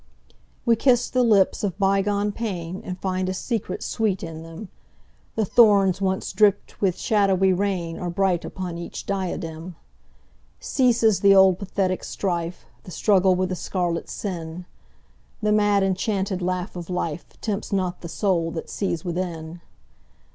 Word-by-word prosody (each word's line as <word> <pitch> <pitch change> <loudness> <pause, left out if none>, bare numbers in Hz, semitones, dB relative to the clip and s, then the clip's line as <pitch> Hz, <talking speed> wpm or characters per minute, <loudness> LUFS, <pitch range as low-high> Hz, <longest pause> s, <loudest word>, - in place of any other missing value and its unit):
We 235 -2 +5
kiss 245 +1 +2
the 255 - +2
lips 215 -5 +3
of 195 -3 -2
bygone 200 +1 +1
painAnd 185 -4 -5
find 185 -1 -2
a 185 - -2
secret 210 -2 -3
sweet 210 -4 -1
in 160 -1 -6
them:The 185 +5 -8
thorns 200 -4 +5
once 190 -1 -1
dripped 205 -2 +2
with 185 -3 +1
shadowy 195 -3 +2
rainAre 180 -3 -2
bright 185 -1 +1
upon 180 -3 -5
each 170 - -7
diadem. 175 -3 -4 0.8
Ceases 235 -5 +2
the 200 -1 +6
old 190 -2 +6
pathetic 190 -2 -1
strife, 175 -2 -3 0.2
The - - -11
struggle 190 0 +3
with 185 0 0
the 185 - -2
scarlet 175 -2 -2
sin:The 180 +3 -7
mad 205 -1 +3
enchanted 195 0 -1
laugh 180 0 -2
of 175 -2 -6
lifeTempts 180 +5 -4
not 185 -3 -1
the 170 - -7
soul 175 -3 0
that 165 - -6
sees 180 -5 -2
within. 170 -2 -4
190 Hz, 135 wpm, -24 LUFS, 175-205 Hz, 0.8 s, the